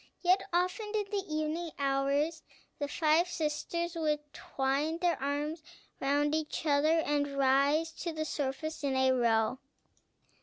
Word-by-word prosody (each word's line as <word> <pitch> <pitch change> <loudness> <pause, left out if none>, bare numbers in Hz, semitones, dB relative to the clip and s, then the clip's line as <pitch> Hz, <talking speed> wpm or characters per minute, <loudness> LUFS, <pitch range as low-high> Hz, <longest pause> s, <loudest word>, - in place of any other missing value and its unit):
Yet 370 +2 +4
often, 365 +5 0
in 415 -1 -1
the 400 -2 -1
evening 310 +2 -2
hours, 280 +3 +1 0.4
the 285 - -1
five 315 +3 +2
sisters 340 +1 -2
would 300 -3 -2
twine 275 +5 -1
their 345 -3 0
arms 295 +3 -2 0.4
round 290 +2 +1
each 315 0 -2
other, 305 +2 +3
and 285 -2 -1
rise 280 +4 +3
to 340 - -2
the 310 -1 -3
surface, 290 +2 -3
in 275 -2 0
a 260 0 +4
row. 235 -1 +2
300 Hz, 140 wpm, -31 LUFS, 280-330 Hz, 0.4 s, Yet